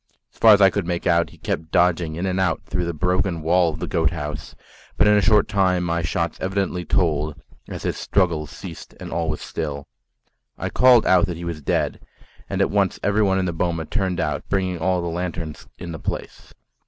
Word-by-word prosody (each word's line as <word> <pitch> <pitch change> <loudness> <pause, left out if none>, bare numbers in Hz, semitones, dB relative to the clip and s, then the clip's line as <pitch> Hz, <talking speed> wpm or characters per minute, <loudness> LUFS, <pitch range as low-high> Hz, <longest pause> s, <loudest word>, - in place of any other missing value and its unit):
As - - -24
far 110 -2 +8
as 100 - 0
I 95 -1 +7
could 100 -4 -2
make 85 -1 -2
out, 85 0 +3
he - - -17
kept 80 0 -4
dodging 85 -2 +2
in 85 +3 -3
and 95 0 -1
out 95 -3 0
through 90 -1 -2
the 85 - -1
broken 90 0 0
wall 85 +1 +3
of 75 - -7
the - - -4
goat 85 -5 +1
house; 75 -3 -6 0.4
but - - +4
in 105 - +6
a 105 - +4
short 105 +2 +4
time 95 -3 +2
my 85 -1 0
shots 85 +1 -2
evidently 95 -1 -1
told, 75 -4 0 0.3
as - - -6
his - - -2
struggles 85 -6 0
ceased - - -10
and - - -8
all 80 -1 -1
was 75 - -3
still. 70 -3 -5 0.7
I - - -3
called 125 -3 +5
out 95 +1 +4
that 85 -3 -4
he 85 - -7
was 85 -3 -5
dead, - - -1 0.5
and - - -1
at - - +2
once 100 -2 +1
everyone 100 -1 +2
in 95 - 0
the 90 - -2
boma 85 -1 -1
turned 95 -1 -2
out, 80 - -2
bringing 95 -3 -1
all 90 +1 0
the - - -2
lanterns 85 -2 -5
in 85 -2 -7
the 80 - -6
place. - - -6
85 Hz, 215 wpm, -22 LUFS, 80-95 Hz, 0.7 s, far